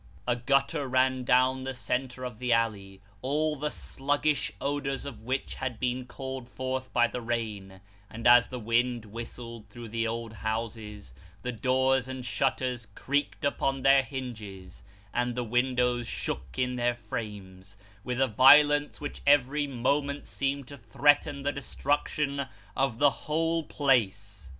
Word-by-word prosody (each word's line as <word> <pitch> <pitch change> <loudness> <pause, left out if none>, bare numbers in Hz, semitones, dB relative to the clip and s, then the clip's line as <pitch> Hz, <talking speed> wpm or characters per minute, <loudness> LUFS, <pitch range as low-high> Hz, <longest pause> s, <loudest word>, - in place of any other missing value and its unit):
A 120 - +3
gutter 140 +4 +1
ran 130 0 +2
down 130 +1 +3
the 130 0 -4
centre 130 +1 -2
of 125 -3 -6
the 125 -1 -1
alley 100 -4 0 0.2
all 150 +3 0
the 150 +1 -2
sluggish 145 -4 -1
odours 140 -1 -2
of 140 - -7
which 130 +4 -2
had 130 -3 -4
been 125 0 -1
called 130 -1 -6
forth 130 0 -4
by 120 -1 +4
the 125 +1 -4
rain; 105 -5 -4 0.3
and 115 +1 -8
as 120 0 +7
the 125 - -6
wind 120 0 0
whistled 115 0 -8
through 115 +2 -9
the 115 +1 -1
old 115 0 -4
houses, 110 - -4 0.3
the 125 - -2
doors 130 +2 +2
and 130 -1 -6
shutters 125 -3 -1
creaked 145 +2 -1
upon 135 -1 0
their 135 0 +7
hinges, 110 -9 -7 0.3
and 120 0 0
the 125 - -1
windows 125 0 +1
shook 65 0 -4
in 125 0 0
their 120 0 +1
frames, 100 -4 -7 0.3
with 125 0 -3
a 135 - +4
violence 145 +5 +6
which 145 - -6
every 145 +1 +4
moment 140 +3 0
seemed 140 -1 -2
to 140 -2 -10
threaten 140 +5 +2
the 145 - +1
destruction 140 0 -1 0.3
of 135 -3 +1
the 145 +2 +5
whole 165 +3 -1
place. 100 - 0
125 Hz, 150 wpm, -29 LUFS, 115-135 Hz, 0.3 s, as